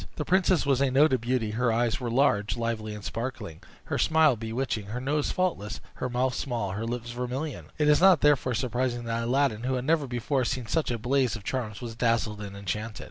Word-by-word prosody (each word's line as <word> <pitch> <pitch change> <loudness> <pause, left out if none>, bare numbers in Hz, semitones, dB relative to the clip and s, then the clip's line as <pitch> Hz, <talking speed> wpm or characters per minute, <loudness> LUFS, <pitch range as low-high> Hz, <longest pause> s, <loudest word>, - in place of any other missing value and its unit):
The 150 - -3
princess 185 -3 +3
was 135 -1 +2
a 140 - +3
noted 130 -1 +4
beauty: 120 -2 0
her 120 +2 +1
eyes 120 +4 +1
were 125 -2 -3
large, 115 -4 +2
lively, 110 -2 -3
and 105 - -9
sparkling; 115 -9 -5 0.2
her - - -3
smile 160 -4 +4
bewitching; 115 -1 -3
her 115 +5 -4
nose 145 +3 0
faultless; 175 - -1 0.2
her 130 - -2
mouth 125 +1 0
small; 120 -7 -2
her 105 +4 -3
lips 120 0 -4
vermilion. 125 +4 -4
It 150 - +2
is 150 +1 +5
not 185 -5 +6
therefore 135 -4 +3
surprising 120 0 -1
that 115 0 -2
Aladdin, 120 -2 +1
who 130 +2 -1
had 125 0 -3
never 155 -2 +2
before 125 +2 -1
seen 125 0 -2
such 155 +8 0
a 120 - -1
blaze 125 +1 +1
of 105 - -9
charms, 110 -3 -3
was 120 -2 -5
dazzled 115 -3 0
and 100 -1 -7
enchanted. 105 +3 -4
125 Hz, 210 wpm, -27 LUFS, 115-135 Hz, 0.2 s, not